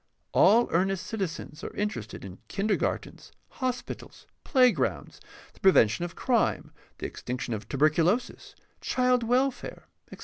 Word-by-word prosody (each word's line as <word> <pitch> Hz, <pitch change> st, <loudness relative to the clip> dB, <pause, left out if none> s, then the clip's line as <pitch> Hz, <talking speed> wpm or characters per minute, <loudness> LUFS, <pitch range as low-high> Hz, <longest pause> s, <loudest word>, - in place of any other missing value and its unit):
All 235 Hz, +3 st, +5 dB
earnest 190 Hz, +2 st, +1 dB
citizens 185 Hz, -6 st, -5 dB
are -, -, -6 dB
interested 120 Hz, -, -4 dB
in 95 Hz, -1 st, -10 dB
kindergartens, 205 Hz, +1 st, -2 dB, 0.2 s
hospitals, 255 Hz, -2 st, -5 dB, 0.2 s
playgrounds, 255 Hz, -4 st, +2 dB, 0.3 s
the -, -, -22 dB
prevention 170 Hz, -, +4 dB
of 175 Hz, -, -5 dB
crime, 245 Hz, -3 st, 0 dB, 0.3 s
the -, -, -6 dB
extinction 125 Hz, -1 st, -4 dB
of 110 Hz, -1 st, -6 dB
tuberculosis, 160 Hz, -, +1 dB, 0.3 s
child 250 Hz, -1 st, +2 dB
wel 250 Hz, +4 st, +2 dB
fare, -, -, -10 dB, 0.2 s
etc. -, -, -10 dB
195 Hz, 125 wpm, -28 LUFS, 155-245 Hz, 0.3 s, All